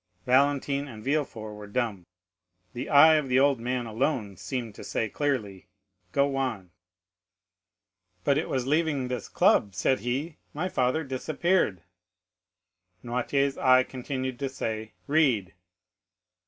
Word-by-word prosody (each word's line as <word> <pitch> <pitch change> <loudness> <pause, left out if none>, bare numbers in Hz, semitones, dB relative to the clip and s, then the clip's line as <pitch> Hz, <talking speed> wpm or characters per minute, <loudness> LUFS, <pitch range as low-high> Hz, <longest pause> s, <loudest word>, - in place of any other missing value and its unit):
Valentine 140 +2 +2
and 110 -5 -10
Villefort 130 -7 -2
were 105 0 -9
dumb; 100 -5 -2 0.7
the 125 +3 -5
eye 155 +2 +7
of 145 -3 -2
the 125 +1 +4
old 140 -2 +3
man 125 +1 -2
alone 110 -3 -1
seemed 120 -3 -5
to - - -11
say 110 - -1
clearly, 110 -7 -2 0.4
"Go 140 +3 +1
on." 115 -10 -3 1.5
"But 140 +1 +3
it - - -4
was 130 -2 0
on 130 - -5
leaving 150 -5 +1
this 125 -4 -4
club," 100 -2 +3
said 130 +8 +1
he, 135 +8 -3 0.2
"my 175 +5 -2
father 130 +2 +1
disappeared." 140 - 0 1.2
Noirtier's 135 +3 0
eye 130 0 +5
continued 130 -1 -5
to 140 -1 -2
say, 110 -4 -4
"Read." 130 - +2
130 Hz, 130 wpm, -27 LUFS, 110-140 Hz, 1.5 s, eye